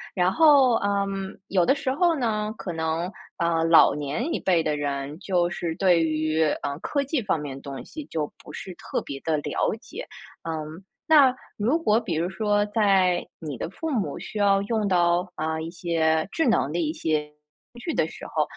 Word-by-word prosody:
然 180 +1 +2
后， 280 -7 +6
嗯， 195 -1 -2
有 185 -2 +3
的 270 - +3
时 265 -2 -2
候 335 +3 +2
呢， 215 -4 -1
可 175 - -5
能， 160 +3 -2 0.3
呃， 170 -2 +1
老 165 0 +6
年 150 - -2
一 - - -1
辈 175 -4 +2
的 150 -1 0
人， 145 +1 -3
就 180 -3 +1
是 165 -2 -3
对 175 -3 +3
于， 155 0 +1 0.2
呃， 140 +1 -3
科 285 -1 -1
技 280 0 -1
方 195 -7 0
面 145 -2 -6
的 - - -11
东 140 -2 -7
西 310 - -8
就 155 - -4
不 - - -11
是 185 - -7
特 - - -4
别 140 -1 -6
地 160 +2 0
了 145 - -1
解。 - - -9 0.3
嗯， 160 +2 -6 0.2
那 290 -5 +7 0.2
如 240 +10 +1
果 225 -9 +3
比 195 -8 -3
如 165 +3 0
说 205 +1 +1
在 195 -4 +2
你 150 -6 -6
的 - - -3
父 320 - -5
母 225 -7 -1
需 215 - -6
要 200 -1 +4
用 215 0 0
到， 175 -1 +2
啊， 160 +1 -2
一 160 - -5
些 165 -1 0
智 325 -4 +1
能 150 - +2
的 170 - -1
一 155 -2 0
些 155 -2 -1 0.4
工 240 - -12
具 325 +7 -3
的 - - +2
时 - - -10
候， - - +1
180 Hz, 215 characters per minute, -25 LUFS, 160-210 Hz, 0.4 s, 那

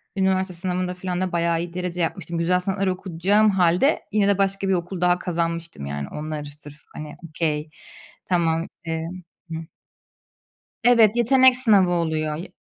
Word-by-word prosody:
üniversite 190 -1 +1
sınavında 180 +1 -2
filan 180 0 -4
da 185 - -1
bayağı 170 -1 +1
iyi 170 0 -5
derece 180 -1 -3
yapmıştım. 170 0 -3
Güzel 180 +2 +2
sanatlar 195 +1 -1
okuyacağım 190 +3 +2
hâlde 180 - +3
yine 205 -1 +2
de 200 -1 +3
başka 195 0 0
bir 190 - +2
okul 175 0 -3
daha 180 0 +3
kazanmıştım 170 - -3
yani. 70 0 -4
Onları 150 -1 -5
sırf, 150 0 -12
hani, 150 -1 -7
"okay, 155 -1 -2 0.6
tamam," 165 -2 +1 0.2
emm 165 +2 -5 0.3
Hıh. 160 - -3 1.3
Evet, 230 -3 +5
yetenek 255 +1 +5
sınavı 205 -8 +4
oluyor. 160 -3 -1
Y 180 - -8
180 Hz, 150 wpm, -23 LUFS, 165-190 Hz, 1.3 s, Evet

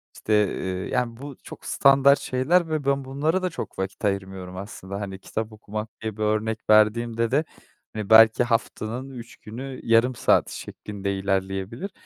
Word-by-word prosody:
işte, 110 - -2 0.2
eee, 95 0 -4
yani 125 -2 -1
bu 140 +1 -8
çok - - -11
standart 140 0 +5
şeyler 160 +7 +1
ve 155 -3 -2
ben 140 -1 +1
bunlara 155 +7 0
da 185 - +1
çok - - -7
vakit 95 +3 -4
ayırmıyorum 95 -2 -3
aslında. 100 0 -7
Hani, 95 -1 -6
kitap 110 +3 -4
okumak 110 +1 -6
diye 110 -2 -4
bir 110 - -2
örnek 110 +1 0
verdiğimde 115 +2 +3
de, 150 +4 +2 0.5
hani, 105 -2 -5
belki 110 +1 +7
haftanın 120 +1 -2
3 120 -2 -10
günü, 125 +4 -8
yarım 115 +2 +3
saat - - +3
şeklinde 100 -1 -5
ilerleyebilir 95 - -2
110 Hz, 160 wpm, -24 LUFS, 100-130 Hz, 0.5 s, belki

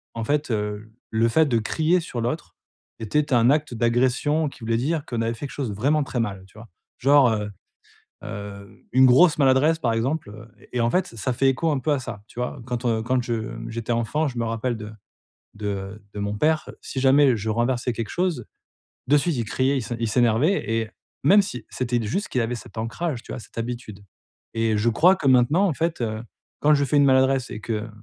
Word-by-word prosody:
en 115 - -3
fait, 145 +2 0
heu, 105 0 -3 0.2
le 115 +1 +2
fait 160 +6 +4
de 120 -4 +2
crier 160 +10 +1
sur 120 -7 -5
l'autre, 125 +8 -4 0.4
était 140 +6 0
un 120 +1 +5
acte 150 -4 0
d'agression 125 +6 +1
qui - - -17
voulait 115 0 0
dire 150 +4 -1
qu'on 115 -2 -3
avait 115 +1 0
fait 130 +5 -6
quelque - - -13
chose 135 -5 -3
de - - -6
vraiment 145 +7 +2
très 125 - -3
mal, 95 -4 -4
tu 95 - -21
vois? 115 +1 -12 0.3
Genre, 140 -1 +5
heu 105 -1 -2 0.7
heu, 100 -2 -9
une 130 0 +7
grosse 150 +6 +6
maladresse, 140 +4 +4
par 120 - 0
exemple, 130 +2 -1
heu, 110 +2 -12 0.2
et 125 - -1
en 115 - +2
fait, 185 0 +1
ça 115 +2 -3
fait 135 +2 +3
écho 160 +5 0
un 140 - 0
peu 150 - -1
à 140 - 0
ça, 105 -4 -7
tu 120 - -10
vois? 125 +1 -3
Quand, 125 0 -4
heu, 110 -2 +1
quand 125 +2 +1
je, 120 - -2
mmh, 110 -1 -5
j'étais 115 +1 -4
enfant, 145 +7 0
je 125 - -9
me 115 - 0
rappelle 115 +1 -2
de 105 0 -8 0.6
de 100 0 -5
de 105 - -6
mon 100 +1 -2
père. 155 +2 +1
Si 135 - -5
jamais 135 -1 +5
je 110 +2 -3
renversais 120 +2 0
quelque 115 -1 -4
chose, 175 -9 -1 0.6
de 145 +2 +5
suite, 160 +1 0
il 115 - 0
criait, 130 +5 +1
il - - 0
s 115 - -8
il 115 - 0
s'énervait, 125 - +2
et 115 -1 -1 0.3
même 200 +8 +6
si, 125 - -6
c'était 120 -1 -1
d 110 - -3
juste 200 - -2
qu'il 125 - 0
avait 115 +1 -1
cet 115 -1 -11
ancrage, 120 +4 -3
tu - - -11
vois? - - -5
Cette 115 - -15
habitude, 115 -4 -5 0.5
et 115 -1 +1
je 115 +3 +2
crois 175 +11 +5
que 145 -7 -2
maintenant, 135 +10 +4
en 165 - 0
fait, 165 -3 -2
heu, 110 -1 -2 0.4
quand 150 +1 +5
je 140 -1 +1
fais 145 - +1
une 145 - +5
maladresse 130 -1 +3
et 105 - -5
que 110 0 -3
120 Hz, 225 wpm, -24 LUFS, 115-145 Hz, 0.7 s, une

